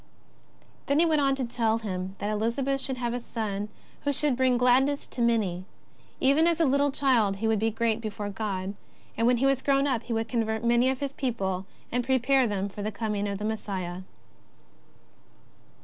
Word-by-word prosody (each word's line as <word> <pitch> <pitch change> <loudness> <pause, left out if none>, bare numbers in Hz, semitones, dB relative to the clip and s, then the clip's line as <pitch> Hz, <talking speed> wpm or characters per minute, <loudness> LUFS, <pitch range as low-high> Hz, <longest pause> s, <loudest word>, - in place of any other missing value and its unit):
Then 280 - +2
he 335 - +5
went 310 -3 +2
on 275 -1 +3
to 265 -2 -2
tell 230 -2 +1
him 190 -3 -4
that 205 - -2
Elizabeth 245 +6 0
should 265 -1 -1
have 240 -1 -2
a 245 - -2
son 210 -3 -4 0.3
who 285 - 0
should 285 -1 +2
bring 255 -1 +3
gladness 260 +3 +3
to 245 - -6
many. 215 -7 +1 0.6
Even 285 +5 +4
as 340 -1 +1
a 330 - +4
little 280 +1 +3
child 250 -8 +2
he 220 +3 -2
would 220 -1 +2
be 225 +2 +2
great 225 0 0
before 210 -2 -4
God, 195 -2 -3 0.4
and 230 - +2
when 245 0 +4
he 260 - +1
was 270 -1 +2
grown 275 0 +2
up 255 -5 0
he 240 - -5
would 225 0 -1
convert 220 -1 -1
many 240 +2 +3
of 265 0 -2
his 280 -1 -2
people 195 -9 -2 0.2
and 245 +1 0
prepare 265 +1 +3
them 200 -2 -1
for 205 +1 -8
the 215 +1 -2
coming 210 -1 -2
of 200 -1 -3
the 210 - -4
Messiah. 190 -5 -3
235 Hz, 195 wpm, -27 LUFS, 210-265 Hz, 0.6 s, he